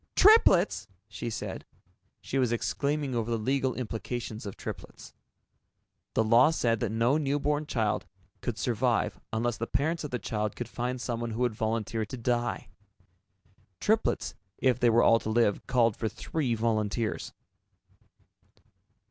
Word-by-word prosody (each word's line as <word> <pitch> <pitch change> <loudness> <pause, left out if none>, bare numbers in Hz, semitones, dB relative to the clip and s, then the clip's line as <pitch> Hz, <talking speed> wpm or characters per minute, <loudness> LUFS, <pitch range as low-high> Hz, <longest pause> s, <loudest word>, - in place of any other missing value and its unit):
"Triplets!" 370 - +5 0.2
she 110 +2 -5
said. 110 - -5 0.6
She 135 - -2
was 125 -3 +2
exclaiming 140 +3 -1
over 115 -1 -1
the 115 - +1
legal 130 +3 0
implications 115 -2 -4
of 100 - -7
triplets. - - -8 1.0
The 110 - +4
law 115 +6 +6
said 115 -8 +1
that 115 - -1
no 120 +7 +2
newborn 145 +1 0
child 110 -7 -1 0.3
could 120 -3 -3
survive 120 -3 0
unless 115 +1 -1
the 115 - -3
parents 160 +3 0
of 150 - -4
the 125 - -2
child 105 -2 -3
could 120 - -4
find 125 +1 -3
someone 120 -1 -3
who 115 +2 -4
would 120 -2 +2
volunteer 110 0 -1
to 110 +5 -6
die. 120 0 -1 1.1
Triplets, 220 +1 +1 0.2
if 130 -2 +2
they 120 - +4
were 115 +1 +4
all 115 - +6
to 110 - -5
live, 110 -2 +1
called 115 -4 +3
for 110 - -2
three 125 +3 -2
volunteers. 110 0 -1
120 Hz, 145 wpm, -29 LUFS, 110-130 Hz, 1.1 s, law